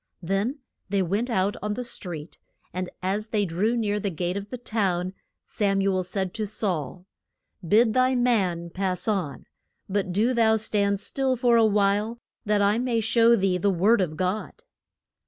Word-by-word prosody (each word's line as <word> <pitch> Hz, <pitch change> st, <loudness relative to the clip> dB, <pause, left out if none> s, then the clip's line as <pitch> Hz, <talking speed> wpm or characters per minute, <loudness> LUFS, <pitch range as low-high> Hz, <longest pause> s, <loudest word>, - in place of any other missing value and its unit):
Then 200 Hz, -, -1 dB, 0.3 s
they 195 Hz, -1 st, +1 dB
went 205 Hz, +8 st, -1 dB
out 195 Hz, -2 st, +1 dB
on 210 Hz, 0 st, -2 dB
the 250 Hz, -, -4 dB
street, 175 Hz, -9 st, -5 dB, 0.3 s
and 180 Hz, 0 st, -3 dB
as 200 Hz, +4 st, -1 dB
they 215 Hz, -2 st, 0 dB
drew 200 Hz, +8 st, 0 dB
near 210 Hz, -2 st, 0 dB
the 200 Hz, -, -2 dB
gate 175 Hz, +1 st, -3 dB
of 200 Hz, 0 st, -5 dB
the 250 Hz, -, -5 dB
town, 190 Hz, -6 st, -1 dB, 0.3 s
Sam 200 Hz, -2 st, 0 dB
u 195 Hz, 0 st, +2 dB
el 185 Hz, -, 0 dB
said 190 Hz, 0 st, -3 dB
to 215 Hz, -2 st, -2 dB
Saul, 180 Hz, -, -2 dB, 0.6 s
Bid 215 Hz, +6 st, +4 dB
thy 255 Hz, +1 st, +3 dB
man 190 Hz, -9 st, +1 dB
pass 185 Hz, 0 st, -1 dB
on, 190 Hz, -10 st, -2 dB, 0.4 s
but 195 Hz, -2 st, -1 dB
do 220 Hz, +7 st, +2 dB
thou 225 Hz, -2 st, +4 dB
stand 200 Hz, -2 st, 0 dB
still 265 Hz, +4 st, 0 dB
for 240 Hz, -1 st, +3 dB
a 230 Hz, -, +5 dB
while, 205 Hz, +2 st, +1 dB, 0.3 s
that 205 Hz, -1 st, +2 dB
I 205 Hz, +3 st, +3 dB
may 245 Hz, -2 st, 0 dB
show 230 Hz, +1 st, +4 dB
thee 190 Hz, -4 st, +1 dB
the 200 Hz, -, +2 dB
word 195 Hz, +4 st, +3 dB
of 155 Hz, -4 st, -2 dB
God. 185 Hz, +3 st, -3 dB
205 Hz, 175 wpm, -25 LUFS, 185-225 Hz, 0.6 s, a